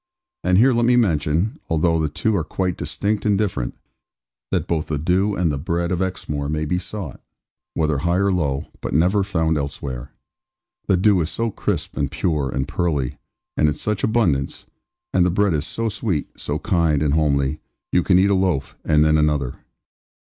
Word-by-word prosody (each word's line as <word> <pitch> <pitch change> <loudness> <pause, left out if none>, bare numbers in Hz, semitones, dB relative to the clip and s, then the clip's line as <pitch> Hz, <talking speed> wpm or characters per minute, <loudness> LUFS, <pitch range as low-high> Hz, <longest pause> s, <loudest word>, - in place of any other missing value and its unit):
And 90 - +3
here 125 +5 +5
let 120 0 +2
me 125 - +5
mention 85 -2 +1
although 80 +1 +2
the 80 -1 0
two 110 +8 0
are 85 - +1
quite 90 +3 -2
distinct 105 +1 -2
and 105 -2 +2
different 90 - -2 0.7
that - - 0
both 80 -2 -1
the 75 - -1
dew 95 +7 +1
and 90 -4 +1
the 70 - -2
bread 85 +3 -1
of 90 0 0
Exmoor 75 -6 -2
may 75 0 -1
be 90 +4 0
sought, 95 -6 -6 0.5
whether 75 -3 +1
high 85 +4 +1
or 100 +1 +2
low, 70 -7 0 0.2
but - - -3
never 90 +6 +3
found 80 -5 0
elsewhere. 70 -2 -5 0.8
The 95 - +3
dew 95 0 +4
is 80 - -1
so 115 +3 -2
crisp, - - -3
and 70 -2 0
pure, 75 -6 -1
and 65 +2 -2
pearly, 75 -5 -1 0.4
and 75 - +3
in 75 - +1
such 105 +7 -2
abundance; 85 - +1 0.5
and 90 - +4
the 90 - +3
bread 100 +1 +2
is 75 0 -1
so 115 0 -2
sweet, 95 -7 -2
so - - -3
kind, 80 -4 +1
and 75 -2 +1
homely, 75 -2 +1 0.3
you 90 - +3
can 90 0 +3
eat 100 +2 +4
a - - +4
loaf, 90 -8 0
and 75 -1 +4
then 80 0 +4
another. 75 -4 +1
85 Hz, 190 wpm, -22 LUFS, 75-95 Hz, 0.8 s, here